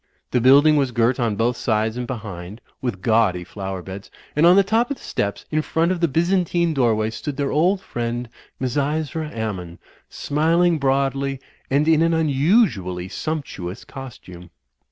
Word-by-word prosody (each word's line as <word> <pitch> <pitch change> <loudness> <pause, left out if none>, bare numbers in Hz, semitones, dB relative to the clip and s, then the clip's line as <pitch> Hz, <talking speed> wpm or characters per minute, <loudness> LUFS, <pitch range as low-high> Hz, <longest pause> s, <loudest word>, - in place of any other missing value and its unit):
The 125 - +2
build 135 +4 +6
ing 155 -1 +5
was 135 -2 +2
girt 120 +1 +1
on 115 -4 0
both 120 +4 +1
sides 110 -1 0
and 125 0 -4
behind 105 -4 -7 0.2
with 115 -8 -4
gaudy 110 -6 +2
flower 95 0 -6
beds, 95 +2 -9 0.3
and 155 +3 +5
on 175 - +7
the 200 - +6
top 225 +4 +1
of 280 - -3
the - - -17
steps, 100 0 -3
in 155 0 +1
front 165 +3 0
of 185 - -1
the 170 - +3
Byzantine 170 +1 +1
doorway, 110 -5 +1
stood 135 +5 -5
their 140 -1 -1
old 180 +6 +2
friend, 120 -4 -4 0.3
Misysra 150 +4 -1
Ammon, 95 -7 -5 0.3
smiling 165 +3 +1
broadly, 135 0 0 0.3
and 145 +3 +2
in 160 -1 +4
an 165 0 +3
unusually 140 - +1
siunp 155 +5 -3
tuous 90 +4 -7
costume. 90 -10 -10
135 Hz, 170 wpm, -22 LUFS, 110-160 Hz, 0.3 s, on